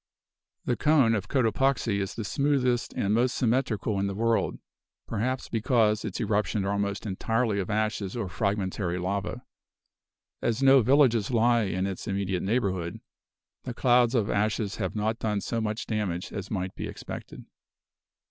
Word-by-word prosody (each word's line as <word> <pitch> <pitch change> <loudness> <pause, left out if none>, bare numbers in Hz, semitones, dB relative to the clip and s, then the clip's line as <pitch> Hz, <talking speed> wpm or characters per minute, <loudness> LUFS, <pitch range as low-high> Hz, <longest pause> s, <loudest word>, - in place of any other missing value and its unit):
The 120 - +1
cone 145 -7 +4
of 100 -3 -2
Cotopaxi 125 -3 +1
is 100 0 -3
the 115 - -4
smoothest 130 +1 +1
and 100 +1 0
most 125 +3 +2
symmetrical 115 -4 0
in 100 - 0
the 100 - -3
world; 115 +2 +1 0.5
perhaps 130 +5 -2
because 110 -2 +2
its - - -4
eruptions 105 -1 0
are 100 - 0
almost 100 0 -2
entirely 110 +2 0
of 95 - -3
ashes 105 -1 -1
or 110 -5 -2
fragmentary 95 -2 -1
lava. 100 +6 -3 1.0
As 120 +3 0
no 135 0 +7
villages 120 -3 +4
lie 120 -1 +3
in 95 -1 -1
its 95 -2 -5
immediate 95 -2 -1
neighborhood, 95 -6 -1 0.6
the 125 -2 -6
clouds 125 -1 +3
of 110 -4 +2
ashes 105 -1 0
have 95 -2 -3
not 110 +2 -1
done 105 -2 0
so 115 +3 -2
much 110 0 -2
damage 100 -4 -3
as 100 -2 -5
might 95 -2 -3
be - - -5
expected. - - -8
110 Hz, 155 wpm, -27 LUFS, 100-120 Hz, 1.0 s, no